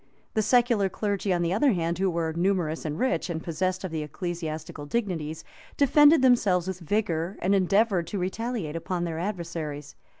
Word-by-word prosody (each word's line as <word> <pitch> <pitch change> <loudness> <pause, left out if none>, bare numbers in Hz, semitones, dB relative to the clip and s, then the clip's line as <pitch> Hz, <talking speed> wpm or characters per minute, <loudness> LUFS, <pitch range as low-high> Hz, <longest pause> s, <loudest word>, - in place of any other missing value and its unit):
The 215 - +2
secular 235 -2 +3
clergy, 200 0 -2
on 175 -1 +1
the 170 +1 0
other 260 +5 +3
hand, 170 -1 -1
who 190 0 +2
were 165 -2 -1
numerous 170 -3 0
and 150 0 -3
rich, 180 -8 0
and 160 -1 -3
possessed 185 +3 -2
of 185 - -4
the 160 -1 -2
ecclesiastical 155 -1 -5
dignities, 160 -7 -2 0.3
defended 290 +1 +6
themselves 200 -8 +3
with 190 -1 -4
vigor 175 -1 -1
and 190 +3 +1
endeavored 195 -1 +2
to 200 - -4
retaliate 190 -2 -3
upon 175 +1 -2
their 165 -2 -3
adversaries. 165 -6 -4
180 Hz, 170 wpm, -26 LUFS, 165-205 Hz, 0.3 s, defended